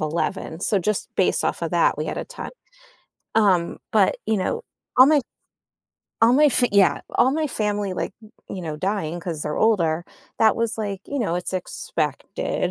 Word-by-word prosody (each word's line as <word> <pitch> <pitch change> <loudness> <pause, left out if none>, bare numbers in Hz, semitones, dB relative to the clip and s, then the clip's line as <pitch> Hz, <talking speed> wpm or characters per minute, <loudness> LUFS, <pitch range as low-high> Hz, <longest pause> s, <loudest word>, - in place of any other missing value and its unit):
11, 160 +2 -2
so, 200 - +2
just 205 +2 -1
based - - +2
off - - -1
of - - -1
that, - - +3
we - - -2
had - - -3
a - - -3
ton. - - -8 0.8
Um, 190 -6 +2
but, - - +3
you 220 - +2
know, 205 - -2 0.3
all 255 - +9
my 300 0 +5 1.0
all 230 - +7
my 290 +4 +5
f 280 -3 +5
yeah, 190 -7 +4
all 260 - +3
my 310 +1 0
family, 210 -6 -1
like, 185 - -3 0.4
you 185 - -6
know, 155 -3 -4
dying 175 -2 -2
'cause 165 -4 -4
they're 150 - -3
older, 175 -7 +2 0.3
that 220 -1 +5
was 230 -1 -1
like, 200 -3 -3
you 285 - -3
know, 200 -8 0
it's 180 +1 -3
expected. 185 - -2
200 Hz, 180 wpm, -23 LUFS, 175-225 Hz, 1.0 s, all